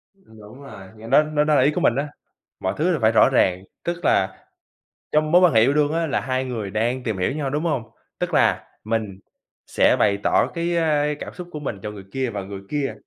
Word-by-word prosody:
Đúng 110 - -16
rồi 95 -8 -11
nghe 110 +1 -11
nó 150 - +5
nó 150 -1 0
đó 150 0 +2
là - - +4
ý 140 +4 +4
của - - -2
mình 115 - +3
á, 140 +3 -1 0.5
mọi 95 0 -2
thứ 170 +5 +1
đều 160 - 0
phải 110 0 +4
rõ 115 - +5
ràng. 95 -8 +2 0.2
Tức 175 0 -4
là 95 0 +1 0.7
trong 155 0 +1
mối 180 - +6
quan 180 -7 +5
hệ 110 - +5
yêu 135 +5 +3
đương 150 0 +2
á 165 0 0
là 140 - 0
2 130 0 -2
người 115 -6 -4
đang 120 +4 -1
tìm 110 -5 -2
hiểu 90 +8 0
nhau, 145 -1 -3
đúng 150 +3 -2
hông? 150 -8 -1 0.4
Tức - - -3
là - - +2 0.2
mình 110 -3 -3 0.5
sẽ - - +3
bày 100 0 +3
tỏ - - +3
cái, 170 0 -1
ơ, 155 -3 +2
cảm - - -7
xúc 180 -1 -9
của 150 - -6
mình 120 -8 -5
cho 105 - -4
người 100 -2 -11
kia 130 +1 -2
và 100 -3 -5
người 100 0 -8
kia 140 -5 -2
130 Hz, 245 wpm, -22 LUFS, 110-150 Hz, 0.7 s, mối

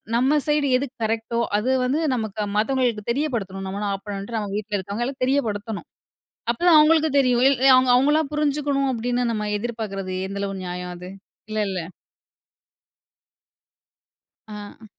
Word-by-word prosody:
நம்ம 270 +5 +3
சைடு 295 -1 +2
எது 280 +2 -2 0.2
கரெக்ட்டோ! 225 +1 -1 0.2
அது 230 +5 -1 0.2
வந்து 275 +5 +1 0.2
நமக்கு 220 -2 -3
மத்தவங்களுக்கு 235 -1 +1
தெரியப்படுத்தணும். 220 -9 -2
நம்ம 195 +2 -4
என்னானாப் 200 -1 -3
பண்றோண்ட்டு 205 +3 -4
அவுங்க 200 -1 -4
வீட்ல 210 -1 -2
இருக்கவங்களுக்கு 240 +8 -3
தெரியப்படுத்தணும். 220 -6 -2 0.6
அப்ப 235 - -3
தான் 335 -3 +8
அவுங்களுக்கு 315 0 +5
தெரியும். 250 -2 +2
இல் 275 -3 +2 0.2
அவ் 255 -1 +3
"அவுங்களா 295 +4 +3
புரிஞ்சுக்கணும்" 285 -2 0
அப்பிடின்னு 245 +1 -1
நம்ம 210 -1 -2
எதிர்பாக்கிறது 205 -5 -4
எந்தளவு 200 0 -3
நியாயம் 180 0 -5
அது? 180 +1 -9 0.4
இல்லல்ல! 200 -5 -1 2.7
ஆ. 210 +1 -10
225 Hz, 130 wpm, -23 LUFS, 205-270 Hz, 2.7 s, தான்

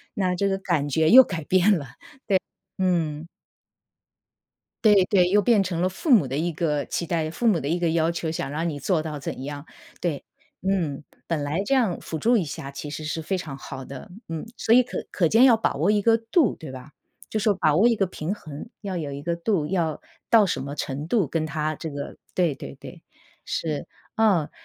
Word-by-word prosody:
那 185 -2 0
这 200 +2 +1
个 195 - 0
感 170 -7 -1
觉 160 +3 +2
又 260 +3 +10
改 170 -8 -5
变 185 +3 +4
了。 145 - -6 0.9
对， 190 - 0
嗯。 160 -3 -1 1.6
对， 205 -3 +6
对， 185 -2 +3
又 205 +2 +4
变 215 -2 +4
成 180 -3 -2
了 185 - +2
父 265 - -3
母 195 - +6
的 135 +2 -3
一 170 +2 0
个 150 -3 -1
期 170 - -3
待， 160 -2 -1
父 235 +7 -1
母 185 -7 +4
的 140 - -4
一 170 +4 0
个 170 -1 +1
要 165 0 +2
求， 170 -1 -3
想 160 - -3
让 165 +3 -1
你 145 -2 -5
做 165 +3 +1
到 155 -2 -5
怎 130 - -5
样， 145 +1 -6 0.4
对， 160 -6 -2 0.4
嗯。 170 -7 -1 0.3
本 160 -3 0
来 150 +6 -1
这 275 - +2
样 225 -9 +1
辅 160 - -5
助 235 +8 +3
一 180 - 0
下 140 -1 -6
其 145 +1 -7
实 155 +1 -6
是 155 +1 -3
非 190 +4 -2
常 145 -6 -6
好 135 -1 -8
的， 135 +4 -9 0.2
嗯。 165 +3 -4
所 225 - +2
以 250 - +8
可 250 - -6
可 175 - +2
见 225 +9 +5
要 245 -4 +7
把 225 - 0
握 165 +9 +2
一 210 -1 +2
个 225 +2 +4
度 230 - +2
对 155 -4 -9
吧？ 130 +3 -10 0.4
就 215 - -1
是 210 0 +3
把 155 -5 +2
握 210 +8 +5
一 235 - +3
个 200 - +1
平 175 +1 -4
衡， 155 +1 -9
要 195 -3 -4
有 150 -4 -3
一 140 +1 -6
个 170 +2 -1
度， 170 -3 0
要 165 -3 -1 0.3
到 225 -3 +6
什 175 - -2
么 140 +1 -5
程 145 +1 -4
度 205 -4 +2
跟 155 +2 -1
他 155 +1 -2
这 160 - -6
个 145 -1 -6 0.2
对 170 -6 +1
对 - - -9
对， - - -11 0.4
是， 155 -3 -3 0.3
哦， 200 -9 +3
170 Hz, 235 characters per minute, -24 LUFS, 150-195 Hz, 1.6 s, 又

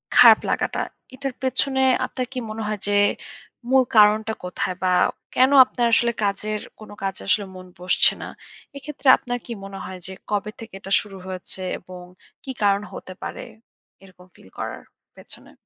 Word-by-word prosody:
খারাপ - - +9
লাগাটা, - - 0 0.3
এটার 275 -1 -4
পেছনে 265 +1 +1 0.3
আপনার 255 - -4
কি 255 - -3
মনে 220 +1 -5
হয় 215 -1 -3
যে, 205 - +1 0.8
মূল 265 0 +5
কারণটা 215 +1 +5
কোথায়? 180 0 -3
বা 185 - +2 0.5
কেন 260 +2 +5
আপনার 240 -1 -1
আসলে 235 +1 +4
কাজের 210 +1 -1 0.2
কোন 215 - -12
কাজে 195 -1 -3
আসলে 205 0 +2
মন 185 0 -10 0.2
বসছে 180 - +4
না? - - -5 0.5
এক্ষেত্রে 280 0 -7
আপনার 245 0 -4
কি 240 - -9
মনে 195 0 -8
হয় 185 -1 -8
যে, 190 - -6 0.2
কবে 210 +1 -1
থেকে 225 -3 -10
এটা 195 - -10
শুরু 195 -2 -11
হয়েছে? 185 0 -7 0.2
এবং 180 0 -11 0.4
কী 265 - -5
কারণ 200 0 +3
হতে 185 - -8
পারে - - -5 0.6
এরকম 185 -1 -17
ফিল 95 - -18
করার - - -5 0.4
পেছনে? - - -10
210 Hz, 165 wpm, -23 LUFS, 190-245 Hz, 0.8 s, খারাপ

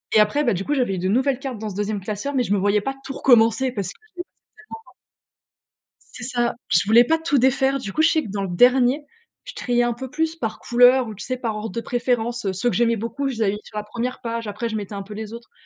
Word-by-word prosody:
et - - +7
après, 215 +8 +3
bah 235 -6 +2
du 190 +2 -3
coup, 295 - 0
j'avais 245 -8 0
eu - - -5
de 185 +1 -1
nouvelles 260 +4 +1
cartes 265 -5 -5
dans 215 -1 -4
ce 190 - -8
2e 205 0 -2
classeur, 215 +8 -4
mais 255 -2 +1
je 205 - -1
me - - +2
voyais 205 +1 +2
pas 270 +4 -3
tout 270 - -6
recommencer 245 0 +4
parce 200 -6 -3
que - - -6
c'était 360 -4 -8 0.5
tellement 450 - -9 1.3
C'est 240 - -5
ça. 240 -1 +1
Je 170 +1 +4
voulais 230 +3 +6
pas 325 +5 +2
tout 305 -4 +1
défaire. 265 +2 +2
Du 200 -6 -6
coup, 315 - +1
je 320 - +5
sais 315 -2 +2
que 225 - -8
dans 200 0 -3
le 195 - -3
dernier, 250 - +4 0.4
je - - -9
triais 240 0 0
un 240 - 0
peu 260 +1 -8
plus 320 +2 -1
par 225 -8 -4
couleur 245 +1 +4
ou, 215 - -7
tu 205 - -8
sais, 255 - -2
par 230 -4 -3
ordre 215 0 -5
de 230 - -4
préférence, 240 -1 -1
heu. 195 - 0
Ceux 200 +6 0
que - - -2
j'aimais 230 0 +2
beaucoup, 235 +6 -3
je 265 - -3
les 225 - -2
avais 195 - +2
mis 210 - -6
sur 215 - -13
la 210 - -4
1re 240 +4 -4
page. 230 -1 -4
Après, 210 +3 -3
je 220 - -4
mettais 205 -1 -5
un 200 - -4
peu 205 +2 -10
les 220 +1 -7
autres. 235 0 -10
235 Hz, 285 wpm, -22 LUFS, 210-260 Hz, 1.3 s, et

